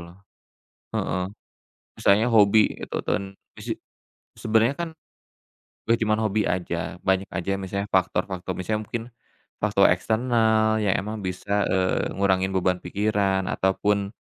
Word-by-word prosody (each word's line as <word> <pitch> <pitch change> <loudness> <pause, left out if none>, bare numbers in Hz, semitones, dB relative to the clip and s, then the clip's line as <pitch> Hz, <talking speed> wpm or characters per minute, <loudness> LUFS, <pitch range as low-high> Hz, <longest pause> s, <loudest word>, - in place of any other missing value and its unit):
loh, 85 +1 -12 0.8
heeh, 90 - -1 0.8
misalnya 105 +4 +4
hobi 105 0 +5
itu - - -5
ten 100 - 0 0.3
mise - - -4 0.6
sebenarnya 115 +4 +2
kan - - -7 1.0
bukan 115 +1 +3
cuma 110 0 +3
hobi 105 -1 +1
aja, 90 -1 -1 0.2
banyak 95 0 +1
aja 90 +1 -3
misalnya 100 +2 -3
faktor-faktor 95 0 0
misalnya 105 +4 -2
mungkin, 115 +1 -4 0.6
faktor 100 -2 +4
eksternal 110 +2 +2
ya 100 -2 +3
emang 105 +2 -3
bisa, 100 +3 -1
eee, 95 0 0
ngurangin 95 -1 +1
beban 90 -1 +2
pikiran 100 0 0
ataupun, 100 +1 0
100 Hz, 120 wpm, -24 LUFS, 95-110 Hz, 1.0 s, hobi